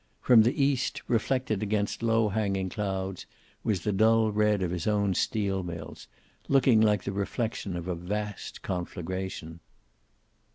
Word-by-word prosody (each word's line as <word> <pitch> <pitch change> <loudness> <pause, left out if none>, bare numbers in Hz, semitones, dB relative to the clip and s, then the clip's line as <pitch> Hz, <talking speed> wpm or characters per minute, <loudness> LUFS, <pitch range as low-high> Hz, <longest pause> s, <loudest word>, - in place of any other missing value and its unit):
From 120 -3 +6
the 125 +6 +2
east, 135 -2 0
reflected 120 -2 0
against 105 -1 -1
low 115 -1 +2
hanging 100 -2 -1
clouds, 95 -2 -3 0.4
was 100 -4 0
the 105 - -1
dull 110 +2 +4
red 105 -2 +2
of 90 - -1
his 90 0 -3
own 100 -2 +2
steel 100 0 0
mills, 85 -3 -8 0.4
looking 130 -5 +4
like 105 -3 +3
the 100 - -3
reflection 100 -1 -3
of 85 0 -5
a 90 - -1
vast 105 +4 -5
conflagration. 90 -2 -4
105 Hz, 140 wpm, -28 LUFS, 95-110 Hz, 0.4 s, From